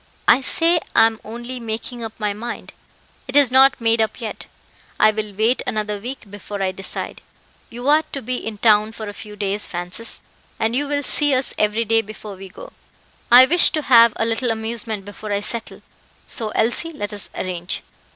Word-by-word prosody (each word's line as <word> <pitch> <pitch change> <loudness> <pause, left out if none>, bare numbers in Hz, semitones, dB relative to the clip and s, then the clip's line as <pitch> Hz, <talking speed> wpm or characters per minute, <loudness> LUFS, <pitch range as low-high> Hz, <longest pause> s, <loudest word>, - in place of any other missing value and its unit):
"I - - +6
say 335 +5 +3 0.2
I - - +7
am 225 -1 0
only 240 +3 -7
making 230 +1 -5
up 220 -1 -6
my 210 -1 -1
mind; 235 +3 -7 0.5
it 260 - -5
is 285 -4 +6
not 265 0 +6
made 230 -1 +2
up 220 - -1
yet. 225 -3 -6 0.5
I 215 - +6
will 215 -1 -4
wait 225 +5 +2
another 210 -1 -2
week 240 -2 -8
before 205 0 -7
I 190 -1 0
decide. 190 0 -6 0.5
You 245 +3 -7
are 300 +2 +5
to 275 - -6
be 250 +2 -2
in 220 -3 -6
town 215 0 +3
for 220 -1 -7
a 205 - -6
few 210 0 -10
days, 205 0 -2
Francis, 180 +6 -3 0.4
and 225 +2 0
you 290 +2 0
will 285 0 -1
see 290 0 +2
us 255 0 0
every 215 +2 +1
day 225 +1 +3
before 215 -1 -10
we 190 0 -10
go. - - -12 0.6
I 250 +2 +10
wish 340 +5 +4
to 310 - -1
have 235 -4 +6
a 225 - 0
little 230 +2 0
amusement 220 -2 -3
before 205 +1 -8
I 200 0 0
settle; 230 +2 -4 0.4
so, 225 -3 -3
Elsie, 240 +11 0
let 205 -7 -4
us 205 - 0
arrange. 180 -1 -3
225 Hz, 195 wpm, -20 LUFS, 210-250 Hz, 0.6 s, I